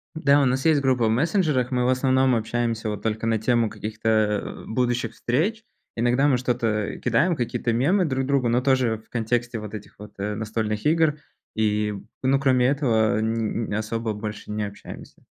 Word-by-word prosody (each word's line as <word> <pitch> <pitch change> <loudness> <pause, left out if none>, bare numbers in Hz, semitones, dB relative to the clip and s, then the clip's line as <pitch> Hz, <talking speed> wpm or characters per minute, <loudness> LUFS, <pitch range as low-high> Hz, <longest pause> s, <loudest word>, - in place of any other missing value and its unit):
Да, 140 -2 +4
у - - +4
нас 130 +2 0
есть 150 -3 +4
группа 130 -4 +2
в - - +2
мессенджерах, 150 - +1
мы 125 -1 +1
в - - +2
основном 130 0 +3
общаемся 115 -1 -1
вот 105 - -5
только 110 0 -2
на 115 -1 +2
тему 115 0 +1
каких-то, 110 +1 -5 0.4
э, - - -8
будущих 120 -1 -1
встреч. 200 - -1 0.3
Иногда 120 +5 +2
мы 130 - +3
что-то 115 -4 -1
кидаем, 140 +9 +2
какие-то 120 -1 -1
мемы 165 - +2
друг 135 -4 -1
другу, 135 -3 +1
но 120 +1 +2
тоже 130 -4 +1
в 110 - -22
контексте 120 0 -1
вот 105 -1 -8
этих 105 - -9
вот, 105 0 -11
э, 105 +1 -2
настольных 110 0 -3
игр. 155 -1 +3 0.4
И, 105 -1 +1 0.3
ну, 135 +1 +3
кроме 130 -2 +3
этого, 115 -6 +2
н 110 0 -1
н - - 0
особо 110 +1 -2
больше 105 0 -7
не 105 0 -2
общаемся. 100 0 -11
120 Hz, 185 wpm, -24 LUFS, 110-130 Hz, 0.4 s, Да